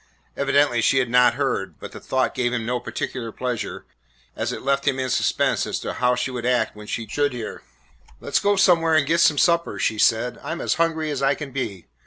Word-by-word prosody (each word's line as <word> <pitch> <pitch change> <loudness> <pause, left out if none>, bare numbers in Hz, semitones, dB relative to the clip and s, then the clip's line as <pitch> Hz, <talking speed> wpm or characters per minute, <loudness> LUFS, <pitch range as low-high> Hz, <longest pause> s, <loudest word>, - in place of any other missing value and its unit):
Evidently 140 -3 +2
she 135 - +3
had 125 -3 +1
not 125 -1 +5
heard, 95 - -2
but - - -8
the - - -9
thought 130 0 -1
gave 120 -1 0
him 115 -2 -2
no 125 +1 -1
particular 120 -2 -5
pleasure, 125 0 -4 0.5
as - - -2
it - - -6
left 140 +1 0
him 135 -2 +2
in 130 -1 -2
suspense - - +1
as - - -2
to - - -4
how 125 0 +1
she 125 +2 -2
would 125 -2 -5
act 125 -2 +1
when 105 0 -11
she 115 - -3
should 145 +4 0
hear. 115 -3 -6 0.6
"Let - - -9
's - - +6
go 205 0 +2
somewhere 170 -4 +4
and 155 -2 +3
get 165 +4 +1
some 155 -3 +4
supper," 170 +1 +2
she 110 - -1
said; 115 +3 +2
"I 150 +4 -4
'm 170 - -6
as - - +1
hungry 160 -2 0
as 140 -2 -3
I 135 +1 +3
can 145 -2 -7
be. 105 -9 -4
130 Hz, 235 wpm, -23 LUFS, 120-145 Hz, 0.6 s, s